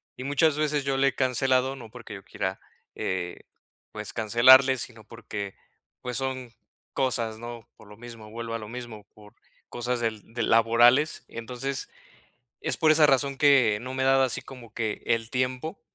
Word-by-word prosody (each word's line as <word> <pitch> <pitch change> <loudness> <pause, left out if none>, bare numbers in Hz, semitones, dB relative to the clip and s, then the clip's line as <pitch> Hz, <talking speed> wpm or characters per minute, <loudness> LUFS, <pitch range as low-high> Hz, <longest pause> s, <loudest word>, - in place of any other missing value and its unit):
Y 125 - -8
muchas 145 +2 +2
veces 150 -1 0
yo 135 -1 0
le 135 +1 +3
he 135 - 0
cancelado, 130 +1 +1
no 120 -4 -11
porque 115 -3 -10
yo 95 - -11
quiera, 95 -1 -4 0.4
eh, 90 -1 -3 0.5
pues - - -7
cancelarle, 130 +4 +6
sino 115 -2 -6
porque, 105 -3 -7 0.5
pues 125 -1 -4
son 130 -2 -4 0.4
cosas, 115 -4 -1
¿no? 120 0 -9
Por 110 - -16
lo 105 0 -14
mismo, 115 -2 -11
vuelvo 115 0 -6
a 115 - -2
lo 105 - -8
mismo, 120 -4 -8
por 105 -1 -17 0.4
cosas 120 0 -2
del 110 -2 -4
de 115 -1 -2
laborales. 120 +6 +4
Entonces, 125 +3 -5 0.7
es - - -2
por 155 - +3
esa 155 -1 +6
razón 140 0 +2
que 135 -7 +4
no 130 +2 -6
me 130 - -1
he - - +2
dado 135 0 +5
así 130 - -1
como 120 -4 -12
que 110 -2 -3
el 115 0 0
tiempo 130 +5 -2
120 Hz, 175 wpm, -26 LUFS, 115-135 Hz, 0.7 s, cancelarle